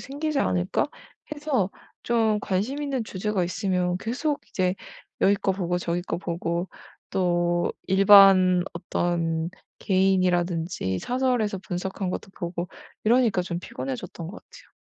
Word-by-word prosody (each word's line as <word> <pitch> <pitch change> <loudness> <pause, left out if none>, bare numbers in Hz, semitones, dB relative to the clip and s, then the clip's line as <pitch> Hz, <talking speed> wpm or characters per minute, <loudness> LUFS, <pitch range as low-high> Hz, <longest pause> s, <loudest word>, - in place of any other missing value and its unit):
생기지 290 +2 -3
않을까?' 180 -7 +1 0.5
해서 285 -10 0 0.3
좀 225 -3 +2
관심 210 +11 -1
있는 270 -5 -2
주제가 205 -1 -2
있으면 180 -1 0
계속 280 +8 -2
이제 185 -2 0 0.5
여기 200 - +5
거 195 -1 0
보고 180 -2 -1
저기 175 0 -2
거 175 - -3
보고 170 0 -2 0.4
또 175 -1 +1
일반 190 -2 +7
어떤 170 -1 -1 0.3
개인이라든지 180 - +1
사설에서 245 - 0
분석한 185 0 -4
것도 195 - -5
보고 175 0 -4 0.4
이러니까 225 -4 +3
좀 175 -1 -4
피곤해졌던 135 +4 -6
거 - - -8
같아요. - - -18
185 Hz, 280 characters per minute, -25 LUFS, 175-215 Hz, 0.5 s, 일반